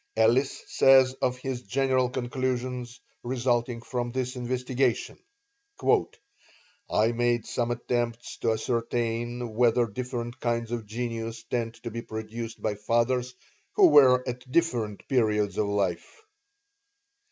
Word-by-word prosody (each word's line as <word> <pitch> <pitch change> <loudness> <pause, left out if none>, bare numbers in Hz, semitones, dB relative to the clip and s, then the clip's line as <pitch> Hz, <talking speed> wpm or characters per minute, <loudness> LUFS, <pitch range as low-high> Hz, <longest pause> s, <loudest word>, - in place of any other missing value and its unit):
Ellis 120 +5 +2
says 130 -1 +5
of 125 0 +1
his 125 -1 -4
general 130 +2 +1
conclusions 125 -1 -3 0.2
resulting 120 -1 -1
from 120 -1 -3
this 130 +1 -2
investigation: 125 0 -1 1.7
"I 110 +2 +3
made 120 -1 +1
some 120 -1 -1
attempts 120 -1 -2
to 115 - +1
ascertain 120 0 -2
whether 120 +1 +3
different 120 +2 -5
kinds 115 -1 -1
of 115 -3 -4
genius 115 0 -4
tend 115 -1 -3
to 115 - -5
be 115 +2 -4
produced 110 +1 -6
by 110 - +1
fathers 120 +4 0 0.4
who 390 -4 +6
were 130 - +6
at 125 +1 -6
different 120 -11 0
periods 105 -6 +1
of 105 - +1
life. 100 - -2
120 Hz, 120 wpm, -27 LUFS, 115-125 Hz, 1.7 s, who